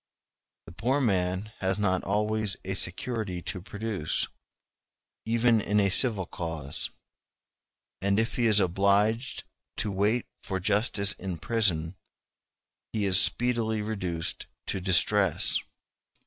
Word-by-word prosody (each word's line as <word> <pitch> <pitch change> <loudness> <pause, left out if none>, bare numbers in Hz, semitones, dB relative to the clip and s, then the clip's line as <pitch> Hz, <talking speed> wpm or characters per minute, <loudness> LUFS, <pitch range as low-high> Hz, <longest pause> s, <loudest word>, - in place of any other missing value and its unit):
The - - -11
poor 130 +11 0
man 95 -3 0
has 95 0 0
not 95 -3 0
always 105 0 0
a 95 - -2
security 95 +1 -3
to 90 - -5
produce, 100 -4 -2 1.0
even 115 0 +3
in 105 +1 +1
a 100 -1 +2
civil 105 -4 +4
cause; 80 -5 -5 1.1
and 100 +2 +2
if 115 +1 -1
he 120 -2 +2
is 105 -2 +5
obliged 100 +6 +1 0.3
to 105 0 -1
wait 105 +5 +1 0.2
for 95 -1 -3
justice 100 +1 +2
in 95 -2 -6
prison, 85 -5 +1 1.0
he 105 -2 0
is 95 0 +6
speedily 115 -3 +1
reduced 90 -6 -3 0.2
to 95 - -2
distress. 95 0 +3
100 Hz, 120 wpm, -28 LUFS, 95-110 Hz, 1.1 s, is